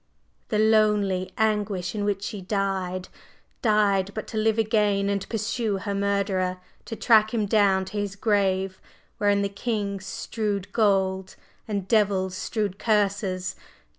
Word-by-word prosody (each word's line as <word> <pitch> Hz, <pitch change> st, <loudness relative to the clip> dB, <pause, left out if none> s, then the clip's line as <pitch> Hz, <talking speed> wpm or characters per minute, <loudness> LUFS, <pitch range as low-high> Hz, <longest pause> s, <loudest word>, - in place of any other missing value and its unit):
the 215 Hz, -, 0 dB
lonely 210 Hz, -4 st, +2 dB
anguish 210 Hz, -4 st, 0 dB
in 210 Hz, -2 st, -2 dB
which 200 Hz, -1 st, -1 dB
she 205 Hz, -1 st, -5 dB
died! 190 Hz, -2 st, -2 dB, 0.5 s
Died, 205 Hz, -4 st, +3 dB
but 215 Hz, -, -4 dB
to -, -, -8 dB
live 220 Hz, 0 st, +2 dB
again 210 Hz, -3 st, +2 dB
and 200 Hz, -1 st, -2 dB
pursue 220 Hz, -1 st, -1 dB
her 200 Hz, +1 st, -4 dB
murderer! 200 Hz, -2 st, 0 dB, 0.3 s
to 225 Hz, -, -5 dB
track 220 Hz, -2 st, +4 dB
him 215 Hz, -2 st, +1 dB
down 200 Hz, -2 st, +3 dB
to 210 Hz, -, -4 dB
his 200 Hz, -1 st, -3 dB
grave 195 Hz, -2 st, 0 dB, 0.4 s
wherein 205 Hz, -1 st, +2 dB
the -, -, +1 dB
king 200 Hz, -1 st, -3 dB
strewed 205 Hz, 0 st, -4 dB
gold, 190 Hz, -3 st, +1 dB, 0.3 s
and 200 Hz, -3 st, -3 dB
devils 195 Hz, -3 st, +2 dB
strewed 205 Hz, -1 st, -3 dB
curses! 200 Hz, -4 st, 0 dB
200 Hz, 135 wpm, -25 LUFS, 190-215 Hz, 0.5 s, track